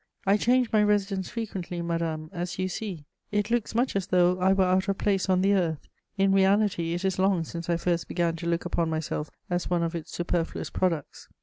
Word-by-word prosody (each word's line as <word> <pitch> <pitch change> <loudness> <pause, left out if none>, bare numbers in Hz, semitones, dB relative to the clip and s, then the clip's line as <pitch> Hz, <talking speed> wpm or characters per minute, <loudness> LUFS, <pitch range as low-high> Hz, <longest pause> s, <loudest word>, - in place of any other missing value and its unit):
I 195 +1 +5
change 245 +3 +2
my 215 - +5
residence 200 -2 +1
frequently, 190 -6 -4
madame, 165 -2 -2
as 175 0 -4
you 185 0 0
see; 185 -5 -5 0.3
it 210 +2 0
looks 235 -2 0
much 245 0 +1
as 195 -1 -1
though 180 -1 +3
I 185 +1 +4
were 195 0 +4
out 185 +1 +2
of 195 -1 0
place 195 -2 0
on 185 -1 +3
the 200 +1 +4
earth: 165 -6 0 0.3
in 195 0 +3
reality, 195 -3 +2
it 175 +2 -3
is 190 -1 0
long 190 -3 +3
since 170 +1 -7
I 170 - +2
first 170 0 -1
began 170 -2 0
to 170 +1 -5
look 170 0 0
upon 170 -2 0
myself 155 -1 -3 0.2
as 175 -1 -2
one 175 -1 +1
of 165 0 -2
its 165 -2 -6
superfluous 175 -1 -2
products. 170 -5 -2
180 Hz, 215 wpm, -27 LUFS, 170-195 Hz, 0.3 s, I